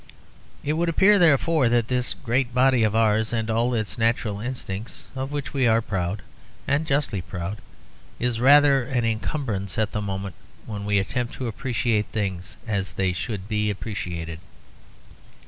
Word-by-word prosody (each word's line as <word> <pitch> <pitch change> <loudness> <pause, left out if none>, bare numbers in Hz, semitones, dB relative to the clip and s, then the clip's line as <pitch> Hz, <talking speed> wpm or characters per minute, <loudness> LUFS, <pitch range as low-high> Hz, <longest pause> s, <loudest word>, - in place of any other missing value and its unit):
It 150 - 0
would 170 +2 0
appear, 200 +5 +5
therefore, 155 -4 +4
that 120 -1 +2
this 125 -1 0
great 125 -1 -1
body 130 -1 +4
of 110 -1 +2
ours 110 -1 +2
and 115 -1 -1
all 120 +2 +1
its 110 +1 -3
natural 115 -2 +1
instincts, 115 -3 -5
of 135 +1 -4
which 145 -1 -4
we 135 -3 +2
are 115 0 +4
proud, 95 -2 -3 0.4
and 145 +3 +1
justly 140 - 0
proud, 90 +3 -5 0.6
is 120 -1 0
rather 140 +1 +6
an 120 -2 -1
encumbrance 110 - -2
at 110 -2 +1
the 105 - -2
moment 100 -2 -4 0.3
when 105 -2 -5
we 100 0 +2
attempt 120 +5 -2
to 130 - -4
appreciate 115 -2 -1
things 95 -2 -4
as 100 -4 -2
they 95 -1 0
should 100 0 -4
be 105 -1 0
appreciated. 85 -6 -5
115 Hz, 160 wpm, -24 LUFS, 100-130 Hz, 0.6 s, rather